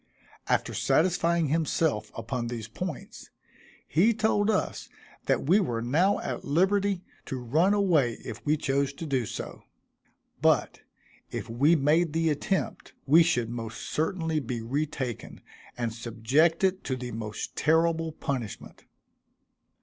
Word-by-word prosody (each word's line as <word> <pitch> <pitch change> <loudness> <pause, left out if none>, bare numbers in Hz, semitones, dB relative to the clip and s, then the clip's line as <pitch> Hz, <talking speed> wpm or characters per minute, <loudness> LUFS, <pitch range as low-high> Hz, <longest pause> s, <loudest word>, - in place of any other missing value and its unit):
After - - +1
satisfying 170 -2 +2
himself 160 -5 0
upon 115 +1 -3
these 115 -2 -5
points, 155 +6 -7 0.6
he 210 +9 +3
told 215 -1 +2
us 210 - -1 0.4
that - - +2
we 180 +8 +5
were 120 - -1
now 170 +11 +2
at - - -4
liberty 190 +4 +1 0.2
to 130 - -3
run 155 - +2
away 165 - +3
if - - -7
we 150 +1 +2
chose 140 -1 0
to 165 - -7
do 130 -6 0
so; - - -6 0.8
but - - +2 0.5
if - - -5
we 140 +8 +4
made 155 +2 +2
the 165 -1 +2
attempt 185 +6 -2
we 155 +5 +7
should 125 -9 +1
most 115 -2 -6
certainly 160 0 -1
be 125 -3 -4
re 135 +7 -1
taken, 130 -6 -5 0.4
and 120 -2 -2
subjected 155 - +1
to 130 - -1
the 125 -1 -6
most 110 -2 -5
terrible 165 +1 +2
punishment. 135 -8 -5
150 Hz, 135 wpm, -28 LUFS, 120-170 Hz, 0.8 s, we